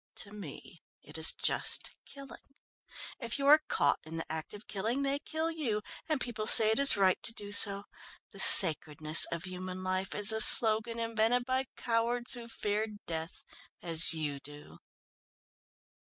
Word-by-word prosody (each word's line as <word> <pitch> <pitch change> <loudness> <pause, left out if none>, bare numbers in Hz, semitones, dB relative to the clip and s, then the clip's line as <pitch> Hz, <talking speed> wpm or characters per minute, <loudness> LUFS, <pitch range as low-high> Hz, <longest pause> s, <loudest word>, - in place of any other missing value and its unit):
To 200 - -12
me 180 -3 -13 0.2
it 155 +2 -10
is 160 - +6
just - - -1
killing. 275 0 -16 0.6
If 235 -2 -8
you 275 - -6
are 300 +2 +4
caught - - -2
in 160 +1 -11
the 165 - -9
act 160 -1 -8
of 205 - -16
killing 225 +7 -5
they 275 +1 -4
kill 320 +2 -6
you, 240 -10 -6 0.3
and 305 -3 -3
people 220 -4 -7
say 220 -1 +4
it 220 - 0
is 280 -5 +6
right 190 -2 -1
to - - -2
do 205 -1 -10
so. 200 -1 +2 0.5
The - - -15
sacredness 155 -2 +5
of 170 -1 -7
human 185 0 -9
life 185 0 -5
is 210 +1 +3
a 220 0 0
slogan 225 +1 +5
invented 230 +1 -3
by 260 +1 -4
cowards 240 +1 -2
who 240 -2 -7
fear 215 -1 -5 0.2
death 165 0 -9 0.4
as 165 -1 +4
you 150 -3 -5
do." 145 +1 -15
210 Hz, 165 wpm, -28 LUFS, 170-240 Hz, 0.6 s, is